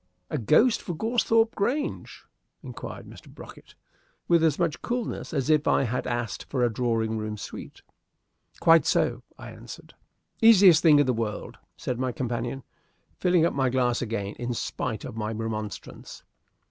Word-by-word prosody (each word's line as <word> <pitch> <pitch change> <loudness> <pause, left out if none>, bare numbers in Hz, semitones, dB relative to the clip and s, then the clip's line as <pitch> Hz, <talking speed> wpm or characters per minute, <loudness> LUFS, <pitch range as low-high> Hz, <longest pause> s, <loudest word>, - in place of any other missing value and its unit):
"A 150 - -1
ghost 185 - +3
for 175 - -5
Goresthorpe 225 +3 +1
Grange?" 265 +9 -3 0.4
inquired - - -8
Mr. - - -14
Brocket - - -14 0.5
with 170 -1 +4
as 155 -3 +2
much 170 -4 -1
coolness 240 -1 -4
as 140 -5 -1
if 155 -1 +2
I - - +3
had 125 0 -2
asked 120 -3 -3
for 130 -3 0
a 120 -2 +1
drawing 110 -2 -1
room 105 0 -4
suite. - - -9 0.8
"Quite 165 -1 +5
so," - - +1 0.2
I - - -10
answered. - - -12 0.5
"Easiest 195 -7 +7
thing 155 -3 +6
in 145 - +4
the 130 - +1
world," 110 -2 -4 0.2
said 125 -1 -4
my 130 -1 -1
companion, 120 +1 -4 0.6
filling 180 -3 +3
up - - 0
my 135 -2 +1
glass 125 -1 0
again 105 -4 -3
in 120 0 -3
spite 110 -1 -4
of - - -8
my 110 -1 -3
remonstrance. 110 -2 -6
130 Hz, 160 wpm, -26 LUFS, 115-170 Hz, 0.8 s, Easiest